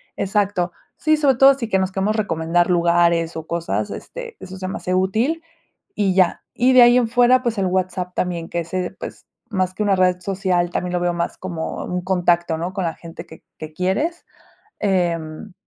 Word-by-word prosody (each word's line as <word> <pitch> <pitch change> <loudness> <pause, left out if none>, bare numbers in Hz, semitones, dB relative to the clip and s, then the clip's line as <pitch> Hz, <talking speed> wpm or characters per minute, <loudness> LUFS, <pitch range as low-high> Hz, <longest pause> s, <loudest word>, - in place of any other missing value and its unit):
Exacto. 195 -3 0 0.3
Sí, 310 0 +3
sobre 285 -3 +3
todo 270 +1 +8
sí, 235 -5 -5
que 190 - +2
nos 190 0 -1
queremos 195 +3 0
recomendar 170 -3 +1
lugares 170 -1 +2
o 160 - -7
cosas, 135 - -2
este, 485 -2 -8
eso 190 0 -9
se 185 0 -5
me 190 - -4
hace 180 - -3
útil, 220 - +1 0.5
y 195 -3 +1
ya. 185 -2 +2
Y 250 +2 +3
de 255 -1 +8
ahí 240 0 +7
en 245 -2 +3
fuera, 245 +2 +4
pues, 235 -4 -2
el 195 - +1
WhatsApp, 185 0 -2
también 170 -2 -2
que 170 - -2
ese, 180 +2 -3
pues, - - -8 0.2
más 185 -3 -1
que 210 - -2
una 200 -2 +2
red 180 -1 +2
social, 180 -2 0
también 180 0 -3
lo 175 - 0
veo 175 0 +1
más 170 0 -3
como 170 -4 -5
un 180 0 -3
contacto, 175 -2 +1
¿no?, 175 +3 -3
con 190 -1 -3
la 165 - -2
gente 165 0 -10
que 160 - -14 0.2
que 155 0 -8
quieres, 245 - -1 0.6
em, 175 -1 -1
185 Hz, 200 wpm, -21 LUFS, 175-210 Hz, 0.6 s, todo